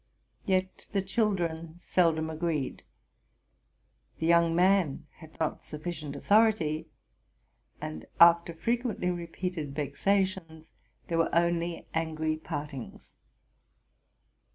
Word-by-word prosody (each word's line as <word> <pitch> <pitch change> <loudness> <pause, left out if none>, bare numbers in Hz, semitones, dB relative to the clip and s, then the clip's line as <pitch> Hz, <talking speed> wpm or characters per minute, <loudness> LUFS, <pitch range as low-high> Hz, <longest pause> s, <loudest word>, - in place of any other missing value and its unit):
Yet 185 -1 0
the 195 -2 +1
children 175 -6 -1
seldom 165 -3 +1
agreed; 155 -4 -2 1.4
the 160 - -2
young 170 0 +4
man 180 -5 +3
had 160 -1 -15
not 160 - -1
sufficient 155 -2 -6
authority; 205 -8 +2 0.9
and, 80 0 -6
after 170 0 +6
frequently 230 +1 -1
repeated 170 -3 -4
vexations, 165 0 -1 0.4
there 165 -1 0
were 165 - +3
only 170 0 +1
angry 160 -1 -1
partings. 145 -5 -7
170 Hz, 90 wpm, -29 LUFS, 160-185 Hz, 1.4 s, after